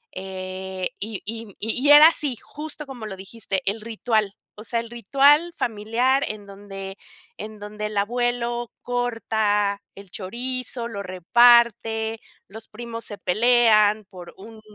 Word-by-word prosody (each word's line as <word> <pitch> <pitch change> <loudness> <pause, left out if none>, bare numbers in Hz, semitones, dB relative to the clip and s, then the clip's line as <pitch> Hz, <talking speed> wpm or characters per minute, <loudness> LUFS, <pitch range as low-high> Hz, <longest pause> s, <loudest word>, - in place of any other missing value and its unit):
eh, 185 0 -5
y 215 0 -4
y 225 -2 -6
y 250 +6 0
era 295 +2 +10
así 290 -6 +1
justo 300 0 -7
como 260 -5 -8
lo 195 -3 -7
dijiste, 195 0 -4
el 205 +3 -1
ritual, 220 -2 -1 0.2
o 210 - -10
sea, 235 - -1
el 230 - -10
ritual 280 - +3
familiar 240 +5 0
en 210 -1 -6
donde 195 -1 -9 0.4
en 215 0 -8
donde 210 +1 -6
el 210 -1 -6
abuelo 240 +2 -1
corta 220 -4 0
el 195 -2 -13
chorizo, 240 +4 -3
lo 200 -3 -5
reparte, 225 +3 +3 0.3
los 220 +2 -11
primos 230 +1 -7
se 205 - -7
pelean 215 0 +4
por 185 -3 -12
un 220 +2 -13
220 Hz, 140 wpm, -23 LUFS, 200-240 Hz, 0.4 s, era